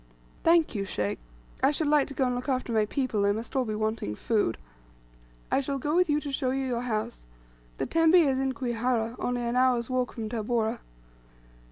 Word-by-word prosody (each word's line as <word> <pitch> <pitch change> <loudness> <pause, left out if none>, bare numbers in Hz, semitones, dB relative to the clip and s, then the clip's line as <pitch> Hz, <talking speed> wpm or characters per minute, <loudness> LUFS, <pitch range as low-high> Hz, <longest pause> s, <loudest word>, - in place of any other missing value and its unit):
"Thank 330 -1 +4
you, 200 -3 -2
sheikh. 105 - -2 0.4
I 270 - +5
should 300 +2 0
like 295 -1 +3
to 275 - -8
go 265 - +2
and 250 - 0
look 250 +3 -4
after 255 -2 -1
my 215 -1 +2
people; 255 -5 -1
they 200 0 +3
must 225 +5 -5
all 260 -2 +2
be 215 -2 -3
wanting 215 - -2
food." 205 - 0 0.9
"I - - +3
shall 275 0 -2
go 295 +4 -1
with 360 -1 +3
you 295 0 +3
to 290 - -5
show 265 -1 -1
you 270 +1 -1
your 245 -2 -1
house. 215 - -3 0.5
The - - -1
tembe 330 +1 +4
is 280 -7 +4
in 265 0 0
Kwihara, 240 -2 -1
only 245 0 -1
an 235 +1 -1
hour's 250 -1 +2
walk 255 0 0
from 225 -3 -4
Tabora." 225 +1 -1
250 Hz, 205 wpm, -28 LUFS, 220-270 Hz, 0.9 s, I